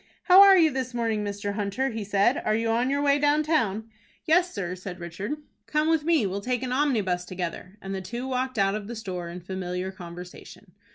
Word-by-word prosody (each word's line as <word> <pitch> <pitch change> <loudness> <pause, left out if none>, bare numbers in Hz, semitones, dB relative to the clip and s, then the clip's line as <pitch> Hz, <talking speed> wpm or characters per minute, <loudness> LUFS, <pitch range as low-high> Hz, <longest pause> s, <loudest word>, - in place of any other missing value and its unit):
"How 370 +1 +8
are 395 -1 +9
you 320 -3 +5
this 255 -2 -4
morning, 225 -3 0
Mr. 205 0 -3
Hunter?" 210 +6 -1
he 225 -1 -4
said. 205 +5 +2
"Are 215 - +1
you 225 +1 0
on 235 +3 +1
your 285 +1 0
way 285 0 +3
down 295 +1 +3
town?" 225 -9 0 0.4
"Yes, 355 +2 +3
sir," 180 -3 -4
said 185 0 -8
Richard. 175 - -5 0.3
"Come 305 +1 +1
with 320 -2 +2
me. 320 -8 +2
We 190 - -2
will 200 +1 -3
take 250 +3 -2
an 255 - -3
omnibus 220 -11 +1
together;" 180 +1 -6
and 195 0 -5
the 190 - -3
two 240 +7 -5
walked 255 -1 -2
out 195 -1 +2
of 210 -1 -4
the 235 - -6
store 180 -6 -5
in 175 +1 -8
familiar 185 0 -4
conversation. 180 -1 -11
215 Hz, 220 wpm, -26 LUFS, 190-265 Hz, 0.4 s, are